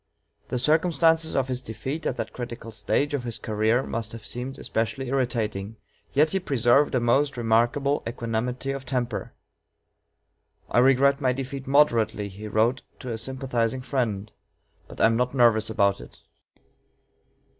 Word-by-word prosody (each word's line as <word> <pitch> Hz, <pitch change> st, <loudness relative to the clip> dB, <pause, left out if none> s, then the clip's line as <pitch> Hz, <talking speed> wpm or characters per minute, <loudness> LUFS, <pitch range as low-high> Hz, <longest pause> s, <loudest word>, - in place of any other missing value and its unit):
The 125 Hz, -, -2 dB
circumstances 160 Hz, +3 st, +2 dB
of 135 Hz, -2 st, +1 dB
his 130 Hz, -1 st, -2 dB
defeat 130 Hz, +8 st, -5 dB
at -, -, -1 dB
that 115 Hz, -3 st, -5 dB
critical 120 Hz, -2 st, -7 dB
stage 145 Hz, +6 st, 0 dB
of 140 Hz, -4 st, -1 dB
his 120 Hz, -2 st, -4 dB
career 110 Hz, +4 st, +1 dB
must 115 Hz, -3 st, -4 dB
have 115 Hz, -1 st, -9 dB
seemed 125 Hz, +3 st, -5 dB
especially 115 Hz, +4 st, -2 dB
irritating, 115 Hz, -6 st, -1 dB, 0.4 s
yet 150 Hz, +3 st, +4 dB
he 195 Hz, -, +1 dB
preserved 135 Hz, -3 st, +3 dB
a -, -, +3 dB
most 135 Hz, +4 st, +2 dB
remarkable 120 Hz, +5 st, +2 dB
equanimity 120 Hz, +3 st, -2 dB
of 135 Hz, -1 st, -5 dB
temper. 125 Hz, -3 st, -3 dB, 1.4 s
"I -, -, +4 dB
regret 135 Hz, +3 st, +4 dB
my 130 Hz, -2 st, +2 dB
defeat 135 Hz, +1 st, -5 dB
moderately," 115 Hz, -7 st, +3 dB
he 100 Hz, +3 st, -9 dB
wrote 115 Hz, +5 st, +1 dB, 0.2 s
to 125 Hz, -, -6 dB
a 115 Hz, -, -3 dB
sympathizing 130 Hz, -1 st, -2 dB
friend, 110 Hz, -6 st, -2 dB, 0.6 s
"but -, -, -12 dB
I -, -, +5 dB
am 115 Hz, 0 st, +4 dB
not 125 Hz, +2 st, 0 dB
nervous 115 Hz, -4 st, +4 dB
about 100 Hz, -3 st, +2 dB
it." -, -, -14 dB
125 Hz, 150 wpm, -25 LUFS, 115-135 Hz, 1.4 s, I